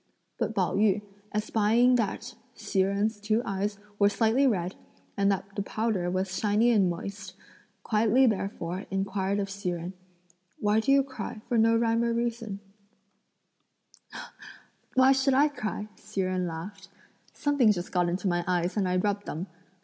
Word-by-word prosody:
But 220 - -1
Pao 185 -3 +1
yü, 205 0 +3 0.3
espying 220 +3 +3
that 230 +2 -2 0.2
Hsi 195 - 0
Jen's 200 +3 0
two 215 +3 0
eyes 200 +1 -2 0.2
were 200 0 +5
slightly 230 +6 +2
red, 185 -6 0 0.4
and 200 0 +2
that 195 +1 -4
the 200 - -1
powder 205 -3 -1
was 185 +1 -2
shiny 215 +3 +3
and 200 -5 +4
moist, 190 +2 -6 0.5
quietly 230 +4 +3
therefore 195 -4 -2
inquired 195 0 -1
of 200 -1 -2
Hsi 200 -2 -3
Jen, 175 +1 -4 0.6
"Why 210 +1 +2
do 265 +5 +1
you 275 0 +5
cry 260 -5 -7
for 245 - -1
no 225 0 +4
rhyme 230 0 +2
or 235 0 +1
reason?" 230 -4 -3 2.3
"Why 260 +1 +6
should 270 0 +3
I 290 +3 +5
cry?" 215 -6 -4
Hsi 210 -2 -4
Jen 185 -1 -1
laughed; 190 +4 -7 0.4
"something 285 -7 +3
just 175 -3 -3
got 180 -1 +1
into 185 +3 -2
my 175 -1 +1
eyes 175 -1 0
and 200 -3 +1
I 180 - +1
rubbed 205 +2 -1
them." 165 +4 -4
205 Hz, 155 wpm, -28 LUFS, 190-225 Hz, 2.3 s, Why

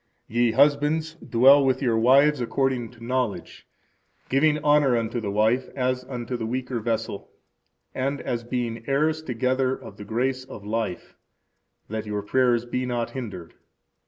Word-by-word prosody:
Ye 120 0 +1
husbands, 150 +4 +2
dwell 135 +1 +5
with 130 -1 +2
your 120 -5 +1
wives 135 +5 +4
according 125 -1 -1
to 115 -1 -15
knowledge, 125 -3 -3 0.6
giving 150 +3 +3
honor 145 -4 +4
unto 115 +1 -2
the 105 - -3
wife, 110 +5 +1
as 130 -1 -1
unto 125 -1 -5
the 115 -2 -3
weaker 125 0 -3
vessel, 110 -3 -3 0.6
and 135 +2 -2
as 120 -1 -3
being 120 -2 -3
heirs 155 +3 +1
together 130 -1 0
of - - -12
the - - -8
grace 130 +5 -1
of 105 -5 -11
life, 110 -4 -3 0.7
that 110 0 -5
your 105 -1 -3
prayers 120 +1 +2
be 125 +1 -2
not 120 -2 -2
hindered. 100 -10 -7
125 Hz, 150 wpm, -25 LUFS, 115-135 Hz, 0.7 s, dwell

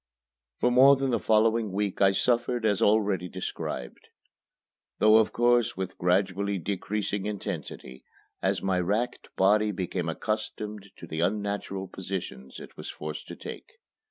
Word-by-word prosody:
For 125 - +3
more 135 +3 +7
than 135 -1 -1
the 115 - +1
following 110 0 +2
week 100 0 -2
I 95 -1 +6
suffered 120 +2 +1
as 105 -3 +2
already 100 -4 +2
described, 75 -9 -5 0.9
though 110 +1 +6
of 110 - +3
course 120 -2 +2
with 95 -1 -5
gradually 95 +2 +1
decreasing 100 +2 -2
intensity 65 -10 -6 0.4
as - - 0
my 95 -1 +1
racked 105 +7 -1
body 105 +3 +4
became 90 -3 -2
accustomed 105 +2 -4
to - - -9
the 80 -1 -5
unnatural 100 +1 -2
positions 90 -9 -6
it - - -12
was - - -7
forced 75 0 -6
to - - -7
take. - - -9
100 Hz, 140 wpm, -27 LUFS, 95-110 Hz, 0.9 s, more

